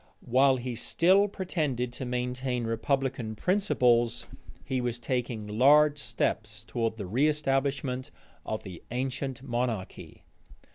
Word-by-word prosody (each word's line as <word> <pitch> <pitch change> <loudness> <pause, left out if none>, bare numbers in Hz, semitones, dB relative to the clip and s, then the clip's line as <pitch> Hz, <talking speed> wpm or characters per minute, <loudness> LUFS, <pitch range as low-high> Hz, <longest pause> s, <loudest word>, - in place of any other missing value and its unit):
While 130 +2 +4
he 125 0 -4
still 185 - +3
pretended 150 - -2
to 130 - -6
maintain 125 0 -2
republican 115 0 -1
principles, 120 - +2 0.4
he 130 -1 -1
was 120 -1 -2
taking 120 -2 -2
large 145 +7 +5
steps 110 -2 -2
towards 115 0 -2
the 105 - -4
reëstablishment 135 +2 0 0.3
of 110 - -4
the 90 -4 -9
ancient 130 +1 -3
monarchy. 120 -6 -4
125 Hz, 110 wpm, -28 LUFS, 115-140 Hz, 0.4 s, large